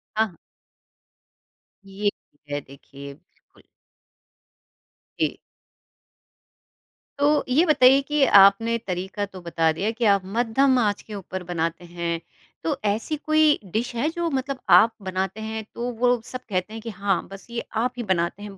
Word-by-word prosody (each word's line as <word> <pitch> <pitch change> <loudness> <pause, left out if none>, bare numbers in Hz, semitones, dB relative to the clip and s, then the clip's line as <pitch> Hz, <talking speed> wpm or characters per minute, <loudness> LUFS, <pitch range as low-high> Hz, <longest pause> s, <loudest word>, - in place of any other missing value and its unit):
हाँ। 215 -5 0 1.5
ये 200 +1 -1 0.4
है 145 - -1
देखिए। 140 +1 -12
बिल्कुल। 175 +6 -27 1.6
जी। - - 0 1.8
तो 295 +1 +3
ये 300 +7 +4
बताइए 275 -4 +6
कि 295 0 +1
आपने 200 +4 +6
तरीक़ा 190 +3 -3
तो 190 -2 -12
बता 165 -1 +1
दिया 190 +7 -2
कि 235 - 0
आप 200 - +1
मध्यम 240 +6 +2
आँच 205 -4 0
के 215 - -11
ऊपर 185 -1 -6
बनाते 165 0 -2
हैं। 170 -1 -3 0.4
तो 310 - 0
ऐसी 220 +9 0
कोई 310 0 +3
डिश 235 +2 -2
है 275 +6 0
जो 340 0 -2
मतलब 270 -1 -3 0.2
आप 225 +2 +5
बनाते 190 +2 -3
हैं 220 0 -4
तो 240 +1 -3
वो 245 - +3
लोग 245 -2 +2
सब 255 +1 -7
कहते 185 +2 -2
हैं 225 - -7
कि 230 - -6
हाँ 200 -3 -1
बस 195 0 -10
ये 235 0 -4 0.2
आप 250 +1 -1
ही 240 - -3
बनाते 175 +4 -2
हैं 200 -2 -9
215 Hz, 150 wpm, -24 LUFS, 185-250 Hz, 1.8 s, बताइए